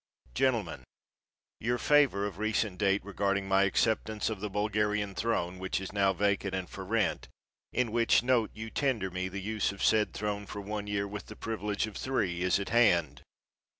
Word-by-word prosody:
_ - - -27
Gentlemen: 115 - 0 0.8
Your 120 +2 0
favor 140 -9 +3
of 100 -2 -5
recent 110 -3 0
date 100 -1 +2
regarding 100 -1 -1
my 95 0 +4
acceptance 110 +2 0
of 110 - -4
the 105 +2 -3
Bulgarian 105 0 0
throne, 95 -4 -1
which 95 0 -2
is 95 0 -7
now 100 -1 +3
vacant 100 0 0
and 95 -1 -3
for 95 - -8
rent, 110 +1 0 0.4
in 125 -2 0
which 115 0 +3
note 120 -3 +2
you 110 0 -8
tender 115 -10 0
me 90 +1 -2
the 100 +2 -5
use 105 +1 -1
of 100 - -6
said 110 -1 +3
throne 105 -1 -3
for 100 - -6
one 105 0 -4
year, 100 0 -1
with 105 +1 -7
the 110 - -9
privilege 105 -2 -2
of 110 -2 -8
three, 95 -10 -1
is 90 +2 +2
at 100 - -4
hand. 105 -9 +3
105 Hz, 185 wpm, -30 LUFS, 95-110 Hz, 0.8 s, my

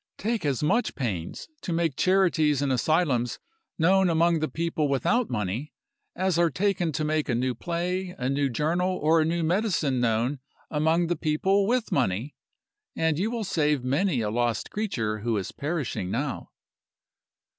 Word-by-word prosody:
Take 220 -6 -1
as 140 0 -1
much 235 +11 +1
pains 100 - -4
to - - -4
make 165 -4 0
charities 165 -7 +2
and 140 - 0
asylums 130 -3 +1 0.4
known 185 +3 +4
among 165 0 +3
the 155 - 0
people 160 +1 -1
without 205 - +1
money 115 +5 -3 0.4
as 185 -2 +1
are 170 -1 +4
taken 180 0 0
to 155 +2 -1
make 155 -1 0
a 120 - +2
new 125 +2 0
play, 180 +4 -3
a 125 - -2
new 140 +1 +1
journal, 175 +8 0
or 160 +2 +3
a - - +2
new 170 +1 0
medicine 165 - +1
known 120 +4 +1 0.3
among 160 +3 +2
the 175 +1 0
people 190 +6 +1
with 245 0 0
money 120 +2 0 0.6
and 160 -1 +1
you 205 +4 +1
will 235 -1 -3
save 150 -8 +1
many 140 +1 +1
a 105 -1 -1
lost 120 -1 -1
creature 115 - -2
who 115 0 -1
is 95 - -4
perishing 145 - -3
now. 135 +5 -3
155 Hz, 165 wpm, -26 LUFS, 130-180 Hz, 0.6 s, known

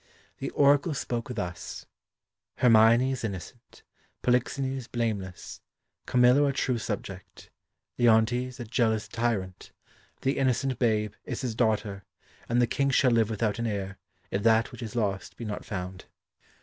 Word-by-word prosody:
The - - -3
Oracle 145 +2 +4
spoke 120 -3 -3
thus: 85 -2 -5 0.7
"Hermione 115 +2 +5
is 130 - -4
innocent; 95 -6 -7 0.4
Polixenes 130 +1 0
blameless; 105 -6 -4 0.5
Camillo 125 +3 +5
a 140 - 0
true 125 -2 0
subject; - - -7 0.5
Leontes 120 +2 +3
a 120 - -5
jealous 110 -2 0
tyrant; 105 -6 -3 0.5
the 135 +1 0
innocent 130 0 +1
babe 105 -4 +1
is - - -4
his 125 -4 -2
daughter; 105 -3 0 0.5
and 120 +1 +2
the 120 - +5
King 140 +3 0
shall 135 -1 +4
live 115 -2 +3
without 110 0 -1
an 115 - -1
heir 100 -2 -4 0.3
if 100 - -1
that 115 +1 +3
which - - -10
is 115 -1 -6
lost 100 -5 -2
be 120 - -6
not 105 -1 -5
found." 90 -2 -6
115 Hz, 140 wpm, -28 LUFS, 105-125 Hz, 0.7 s, Hermione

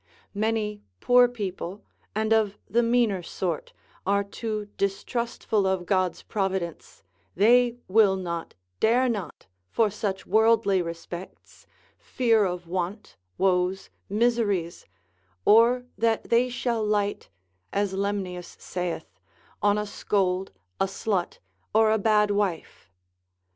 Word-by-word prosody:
Many 210 0 -1 0.2
poor 245 - +6
people, 200 -4 -5 0.3
and 220 +1 +2
of 210 -2 +2
the 235 - +2
meaner 230 -5 +2
sort, 170 -1 -4 0.3
are 200 +1 +2
too 215 +1 -4
distrustful 210 0 -1
of 190 -2 0
God's 185 -1 0
providence, 190 -5 -3 0.3
they 240 +4 +4
will 200 -1 +5
not, 170 -3 -5 0.2
dare 245 +4 +3
not 210 -7 -4 0.2
for 220 - +2
such 200 -2 -3
worldly 220 -2 +3
respects, 170 +2 -9 0.3
fear 230 -4 +2
of 180 -1 -3
want, 185 +4 -4 0.2
woes, 185 0 +1 0.2
miseries, 205 -6 0 0.6
or 235 +3 +5
that 225 -1 0
they 240 +2 +4
shall 240 -2 -1
light, 205 -1 -1 0.4
as 200 -1 0
Lemnius 190 -3 -3
saith, 180 -2 -5 0.4
on 205 0 +3
a 210 - -1
scold, 190 -2 -1 0.3
a - - +3
slut, 195 -1 -2 0.4
or 220 0 +5
a 220 - +2
bad 210 0 +3
wife. 200 -5 -2
205 Hz, 115 wpm, -26 LUFS, 190-225 Hz, 0.6 s, poor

